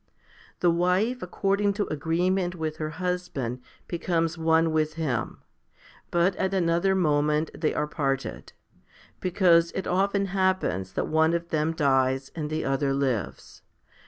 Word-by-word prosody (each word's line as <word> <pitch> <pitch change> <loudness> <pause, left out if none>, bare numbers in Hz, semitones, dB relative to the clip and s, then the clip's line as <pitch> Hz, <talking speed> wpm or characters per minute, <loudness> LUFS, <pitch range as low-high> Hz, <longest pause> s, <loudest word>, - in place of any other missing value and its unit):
The 175 - +4
wife 185 +9 +1
according 200 +3 0
to 205 0 -1
agreement 175 +4 0
with 155 -2 -4
her 155 -1 -3
husband 180 -9 -3 0.3
becomes 165 -1 -1
one 165 0 +2
with 155 0 0
him, 145 -8 -3 0.7
but 175 +2 +2
at 190 +1 0
another 175 +1 +2
moment 150 -2 +1
they 155 - -1
are 150 - 0
parted; 135 -3 -3 0.7
because 175 -2 +3
it 190 - -3
often 195 +2 +1
happens 185 - 0
that - - -1
one 160 +1 +3
of 170 0 -4
them 155 +1 0
dies 135 -3 +1
and 155 -3 -4
the 155 +1 -2
other 135 0 0
lives. 130 - -3
165 Hz, 135 wpm, -26 LUFS, 150-180 Hz, 0.7 s, The